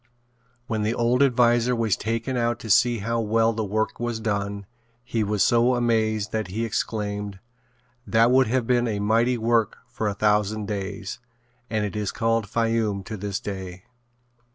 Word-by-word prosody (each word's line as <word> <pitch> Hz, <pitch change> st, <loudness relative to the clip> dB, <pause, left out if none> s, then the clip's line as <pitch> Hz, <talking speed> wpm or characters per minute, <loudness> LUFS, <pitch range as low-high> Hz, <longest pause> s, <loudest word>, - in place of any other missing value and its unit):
When 110 Hz, -3 st, -2 dB
the 110 Hz, +2 st, 0 dB
old 120 Hz, +2 st, +2 dB
adviser 120 Hz, -2 st, +3 dB
was 115 Hz, -3 st, +1 dB
taken 115 Hz, +4 st, -2 dB
out 120 Hz, -1 st, 0 dB
to 110 Hz, -, -3 dB
see 120 Hz, +4 st, +4 dB
how 115 Hz, 0 st, 0 dB
well 115 Hz, +1 st, +2 dB
the 110 Hz, 0 st, -2 dB
work 110 Hz, +2 st, -2 dB
was 120 Hz, -1 st, -2 dB
done, 100 Hz, -2 st, -2 dB, 0.4 s
he 115 Hz, -2 st, -1 dB
was 105 Hz, -1 st, +1 dB
so 120 Hz, +2 st, +3 dB
amazed 110 Hz, -3 st, 0 dB
that 110 Hz, -2 st, -2 dB
he 110 Hz, +5 st, -2 dB
exclaimed: 105 Hz, -2 st, -3 dB, 0.7 s
"That 115 Hz, +2 st, +4 dB
would 130 Hz, -1 st, +4 dB
have 125 Hz, +1 st, 0 dB
been 120 Hz, 0 st, +2 dB
a 105 Hz, -2 st, -1 dB
mighty 115 Hz, +4 st, +2 dB
work 115 Hz, -1 st, +1 dB
for 110 Hz, -, -3 dB
a 100 Hz, -, -1 dB
thousand 105 Hz, 0 st, +1 dB
days," 100 Hz, 0 st, -5 dB, 0.5 s
and 110 Hz, -2 st, 0 dB
it 105 Hz, -, -5 dB
is 105 Hz, -2 st, -2 dB
called 115 Hz, -2 st, 0 dB
Fayoum 115 Hz, -3 st, 0 dB
to 110 Hz, -, -6 dB
this 100 Hz, 0 st, -3 dB
day. 95 Hz, -2 st, -7 dB
110 Hz, 170 wpm, -24 LUFS, 105-115 Hz, 0.7 s, see